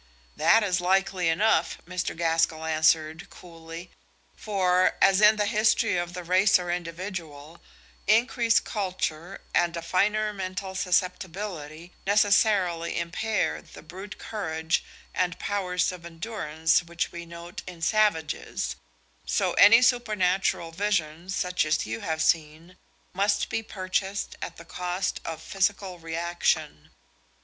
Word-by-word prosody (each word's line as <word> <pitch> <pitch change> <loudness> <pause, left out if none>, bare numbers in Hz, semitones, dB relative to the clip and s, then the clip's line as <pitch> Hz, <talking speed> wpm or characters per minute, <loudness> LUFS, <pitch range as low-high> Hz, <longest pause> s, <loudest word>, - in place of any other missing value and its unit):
"That 225 0 +4
is 180 -3 0
likely 185 -1 +1
enough," 205 +7 +2
Mr. 180 -2 -3
Gaskell 165 -1 +1
answered, 160 0 +1
coolly; 165 0 -11 0.4
"for 185 -3 +1
as 195 +1 +5
in 210 +1 +7
the 210 -1 0
history 220 0 +2
of 175 0 -2
the 180 - -5
race 185 +4 +4
or 175 -1 -4
individual, 170 -3 -6 0.5
increased 230 +2 +3
culture 185 -3 -3
and 175 -1 +1
a 165 - -5
finer 210 +4 +1
mental 190 0 -5
susceptibility 180 -3 -2
necessarily 200 -4 +2
impair 195 +6 -1
the - - -14
brute 190 +6 -9
courage 160 -6 -2 0.3
and 180 -1 -1
powers 185 -3 -1
of 180 -2 -10
endurance 165 -3 0
which 170 -1 -3
we 170 -1 -7
note 170 +2 -9
in 180 -2 -9
savages, 160 - 0 0.5
so - - +1
any 230 +4 +7
supernatural 195 -8 +1
vision 170 -3 -2
such 180 -1 0
as 155 0 0
you 110 +1 -4
have 160 +3 -2
seen 160 +2 0 0.4
must 200 +2 +1
be 225 - -1
purchased 195 -1 -3
at - - -6
the 165 - -12
cost 180 +2 -3
of 160 -1 -6
physical 195 -2 -1
reaction. 165 - -2
180 Hz, 125 wpm, -26 LUFS, 165-200 Hz, 0.5 s, in